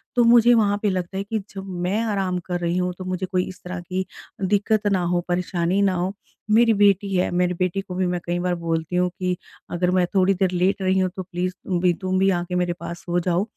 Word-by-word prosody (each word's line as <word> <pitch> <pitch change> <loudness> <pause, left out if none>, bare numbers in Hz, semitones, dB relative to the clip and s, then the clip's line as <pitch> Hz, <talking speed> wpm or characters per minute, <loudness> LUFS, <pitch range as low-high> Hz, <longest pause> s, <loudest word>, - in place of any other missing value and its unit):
तो 245 - +5
मुझे 235 0 +6
वहाँ 205 -3 +3
पे 210 - +2
लगता 185 0 -3
है 195 - -1
कि 220 +2 -2 0.2
जब 195 - -6 0.2
मैं 200 +5 0
आराम 195 -5 -1
कर 180 -1 -2
रही 170 0 -1
हूँ 180 0 0
तो 185 - -7
मुझे 185 0 -2
कोई 185 -1 0
इस 185 -1 -11
तरह 180 0 -5
की 185 +2 -3 0.4
दिक्क़त 205 +2 +1
ना 190 -2 +2
हो 175 - +2
परेशानी 180 +1 0
ना 195 -2 +3
हो, 180 +2 -1 0.4
मेरी 230 +1 +5
बेटी 200 -1 +3
है, 180 - +2
मेरी 180 0 +1
बेटी 185 +2 -1
को 185 -2 -8
भी 185 0 +1
मैं 180 0 -1
कई 175 0 -1
बार 180 0 0
बोलती 165 0 -2
हूँ 180 0 +2
कि 180 -1 0 0.4
अगर 180 +1 +1
मैं 185 -1 +3
थोड़ी 190 0 +4
देर 190 -1 +1
लेट 185 +2 +1
रही 190 0 +2
हूँ 185 - +2
तो 190 - -4
प्लीज़ 180 0 -3
तुम 180 -2 -1
भी 180 -1 +4
तुम 185 0 0
भी 195 +1 +4
आ 175 -2 +1
के 180 0 -5
मेरे 175 -1 +1
पास 170 0 -6
सो 175 -1 0
जाओ, 175 +2 +1
185 Hz, 250 wpm, -23 LUFS, 180-195 Hz, 0.4 s, मुझे